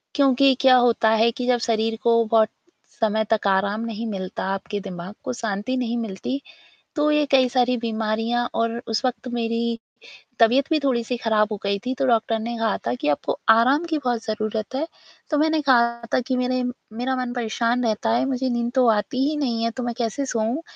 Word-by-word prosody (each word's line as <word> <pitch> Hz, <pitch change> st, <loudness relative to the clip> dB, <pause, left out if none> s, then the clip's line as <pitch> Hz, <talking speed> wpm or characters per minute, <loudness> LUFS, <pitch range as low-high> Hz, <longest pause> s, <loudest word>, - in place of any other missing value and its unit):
क्योंकि 275 Hz, -1 st, +4 dB
क्या 260 Hz, -1 st, +7 dB
होता 240 Hz, -3 st, +3 dB
है 235 Hz, -, +4 dB
कि 250 Hz, +1 st, -5 dB
जब 250 Hz, -1 st, +3 dB
शरीर 225 Hz, 0 st, 0 dB
को 230 Hz, 0 st, +4 dB
बहुत 220 Hz, -1 st, +3 dB, 0.5 s
समय 220 Hz, -1 st, +1 dB
तक 215 Hz, -2 st, 0 dB
आराम 200 Hz, +3 st, +1 dB
नहीं 230 Hz, 0 st, -4 dB
मिलता, 190 Hz, -3 st, -5 dB
आपके 195 Hz, +2 st, -3 dB
दिमाग 185 Hz, 0 st, -7 dB
को -, -, -3 dB
शांति 220 Hz, +1 st, -3 dB
नहीं 240 Hz, -1 st, -1 dB
मिलती, 230 Hz, +5 st, -4 dB, 0.6 s
तो 300 Hz, 0 st, +2 dB
ये 300 Hz, 0 st, +3 dB
कई 260 Hz, -2 st, +5 dB
सारी 250 Hz, 0 st, +2 dB
बीमारियाँ 225 Hz, +1 st, -1 dB
और 230 Hz, 0 st, 0 dB
उस 220 Hz, +3 st, -1 dB
वक़्त 255 Hz, 0 st, -2 dB
मेरी 230 Hz, 0 st, -1 dB, 0.6 s
तबियत 250 Hz, +6 st, +4 dB
भी 315 Hz, -, +3 dB
थोड़ी-सी 245 Hz, -2 st, 0 dB
ख़राब 215 Hz, -2 st, +2 dB
हो 210 Hz, -, -2 dB
गई 200 Hz, 0 st, 0 dB
थी 255 Hz, -, -1 dB
तो 270 Hz, -, 0 dB
डॉक्टर 225 Hz, -1 st, +2 dB
ने 235 Hz, +2 st, -4 dB
कहा 225 Hz, -2 st, 0 dB
था 120 Hz, -, +1 dB
कि -, -, -1 dB
आपको 145 Hz, -, -1 dB
आराम 250 Hz, +8 st, +5 dB
की 320 Hz, -, +1 dB
बहुत 240 Hz, -2 st, 0 dB
ज़रूरत 215 Hz, +2 st, -3 dB
है 305 Hz, +4 st, -1 dB, 0.4 s
तो 300 Hz, -, +2 dB
मैंने 315 Hz, +1 st, +2 dB
कहा 235 Hz, -4 st, +3 dB
था -, -, +4 dB
कि 260 Hz, -, 0 dB
मेरे 250 Hz, 0 st, 0 dB, 0.4 s
मेरा 260 Hz, +2 st, -1 dB
मन 250 Hz, -1 st, -3 dB
परेशान 240 Hz, +1 st, -1 dB
रहता 225 Hz, 0 st, 0 dB
है 240 Hz, -, +1 dB
मुझे 260 Hz, -1 st, -1 dB
नींद 240 Hz, -1 st, -1 dB
तो 255 Hz, -2 st, +4 dB
आती 225 Hz, +4 st, 0 dB
ही 310 Hz, -, -2 dB
नहीं 235 Hz, -6 st, -1 dB
है, 230 Hz, -, 0 dB
तो 250 Hz, +2 st, -5 dB
मैं 240 Hz, 0 st, -2 dB
कैसे 235 Hz, +4 st, -2 dB
सोऊँ 235 Hz, +3 st, -1 dB
235 Hz, 200 wpm, -23 LUFS, 220-255 Hz, 0.6 s, क्या